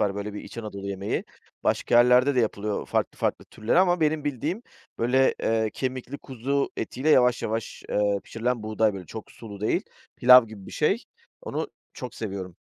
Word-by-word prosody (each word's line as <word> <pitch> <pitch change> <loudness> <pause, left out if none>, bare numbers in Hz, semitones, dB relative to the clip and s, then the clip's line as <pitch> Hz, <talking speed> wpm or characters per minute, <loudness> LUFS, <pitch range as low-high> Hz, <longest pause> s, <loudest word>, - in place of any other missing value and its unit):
var, 100 -1 +1
böyle, 100 0 -5
bir 105 - -5
İç - - -10
Anadolu 100 -3 -6
yemeği. 100 0 -2 0.4
Başka - - +1
yerlerde 125 +3 +5
de 125 - +4
yapılıyor 105 -2 -2
farklı - - -1
farklı - - -1
türleri 110 +10 0
ama 180 -2 +4
benim 155 -1 +1
bildiğim, 150 - -2 0.4
böyle, 130 +3 +3
eee, 110 -1 +1
kemikli 130 +1 -4
kuzu 135 +2 -2
etiyle 130 +6 -2
yavaş 125 -5 +5
yavaş, 110 0 -3
eee, 100 -1 +1
pişirilen 120 0 -2
buğday, 110 -1 +1
böyle, 95 -3 -8
çok 110 +4 -8
sulu 105 -3 -10
değil, 105 - +1 0.3
pilav 125 -1 +8
gibi 105 -3 -11
bir - - -10
şey, - - +1 0.4
onu - - -3 0.2
çok - - -7
seviyorum. 95 -5 -5
115 Hz, 175 wpm, -26 LUFS, 105-130 Hz, 0.4 s, pilav